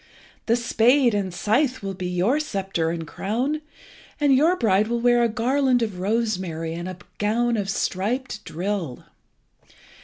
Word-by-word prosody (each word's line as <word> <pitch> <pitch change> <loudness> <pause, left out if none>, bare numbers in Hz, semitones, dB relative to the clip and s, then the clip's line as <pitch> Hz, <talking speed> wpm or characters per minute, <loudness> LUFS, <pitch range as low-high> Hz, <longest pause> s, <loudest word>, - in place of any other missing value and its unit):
The 230 - +4
spade 240 +2 +3
and 200 -2 -1
scythe 245 - 0
will 195 0 -3
be 185 -1 -4
your 185 +11 +1
sceptre 195 - -2
and 165 -1 -3
crown, 245 - -2 0.6
and 290 -2 +4
your 315 +7 +4
bride 215 - +2
will 235 +1 -1
wear 240 0 +4
a 235 - +3
garland 250 +2 +2
of 205 -5 -4
rosemary, 185 -6 -1
and 175 +2 -5
a 185 - -7 0.2
gown 235 +3 +1
of 200 -3 -2
striped 210 +4 -2
drill." 175 -7 -4
215 Hz, 150 wpm, -24 LUFS, 185-245 Hz, 0.6 s, The